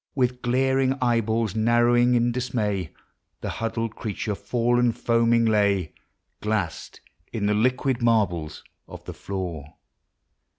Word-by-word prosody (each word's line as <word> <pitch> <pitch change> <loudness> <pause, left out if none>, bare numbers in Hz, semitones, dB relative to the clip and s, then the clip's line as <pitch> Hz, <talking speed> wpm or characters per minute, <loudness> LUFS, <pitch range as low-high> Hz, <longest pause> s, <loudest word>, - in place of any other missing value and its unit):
With 125 -2 0
glaring 130 +1 +2
eyeballs 115 -3 +1
narrowing 120 +2 +3
in 120 0 +2
dismay, 110 -8 -2 0.5
The - - -3
huddled 115 0 -2
creature 105 -1 -3
fallen 120 +3 +1
foaming 115 0 +2
lay, 100 -6 +1 0.5
Glass'd 105 -6 -3 0.3
in 110 -3 -2
the 105 - +2
liquid 125 +3 +1
marbles 95 -10 0 0.2
of - - -11
the - - -6
floor. 85 -7 -6
115 Hz, 115 wpm, -24 LUFS, 105-120 Hz, 0.5 s, narrowing